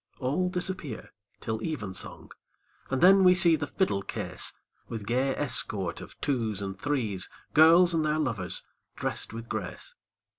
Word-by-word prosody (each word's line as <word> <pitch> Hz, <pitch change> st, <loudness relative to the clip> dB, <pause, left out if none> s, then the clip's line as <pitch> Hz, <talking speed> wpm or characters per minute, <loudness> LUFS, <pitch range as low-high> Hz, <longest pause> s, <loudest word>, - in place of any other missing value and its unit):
All 145 Hz, +8 st, 0 dB
disappear 180 Hz, -, -4 dB, 0.3 s
till 110 Hz, 0 st, -3 dB
evensong, 110 Hz, -, -5 dB, 0.6 s
And 130 Hz, -1 st, -1 dB
then 190 Hz, +1 st, +7 dB
we 180 Hz, 0 st, +7 dB
see 170 Hz, -2 st, +5 dB
the 145 Hz, -1 st, -3 dB
fiddle 165 Hz, -, 0 dB
case, 100 Hz, -, -2 dB, 0.4 s
With 110 Hz, -3 st, -6 dB
gay 130 Hz, +4 st, 0 dB
escort 105 Hz, -10 st, +1 dB
of -, -, -12 dB
twos 115 Hz, -8 st, -1 dB
and 95 Hz, -1 st, -4 dB
threes, 115 Hz, -10 st, -1 dB, 0.2 s
Girls 170 Hz, +3 st, +7 dB
and 160 Hz, -1 st, +1 dB
their 155 Hz, 0 st, +1 dB
lovers 115 Hz, -, -2 dB, 0.3 s
drest -, -, -3 dB
with 115 Hz, +1 st, -7 dB
grace. 105 Hz, -6 st, -6 dB
135 Hz, 145 wpm, -28 LUFS, 110-165 Hz, 0.6 s, then